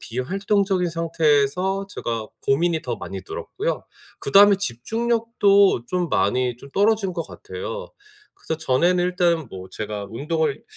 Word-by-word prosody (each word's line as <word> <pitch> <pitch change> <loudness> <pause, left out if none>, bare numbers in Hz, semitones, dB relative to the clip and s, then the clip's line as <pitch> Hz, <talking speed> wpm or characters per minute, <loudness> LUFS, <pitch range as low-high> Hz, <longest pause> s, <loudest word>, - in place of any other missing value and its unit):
비활동적인 190 - 0
상태에서 165 +3 +1
제가 115 - -4 0.2
고민이 160 +3 +2
더 120 -2 -3
많이 95 -1 -7
들었고요. - - -4 0.4
그다음에 200 +7 +6
집중력도 200 - +2
좀 180 -2 -1
많이 125 -1 +1
좀 140 - -13
떨어진 205 -2 +2
것 165 - -2
같아요. 475 +3 -7 0.5
그래서 160 - -4
전에는 175 +5 +2
일단 175 -4 +1
뭐 95 0 -8
제가 105 -1 -5
운동을 150 +3 -1
170 Hz, 300 characters per minute, -23 LUFS, 130-195 Hz, 0.5 s, 그다음에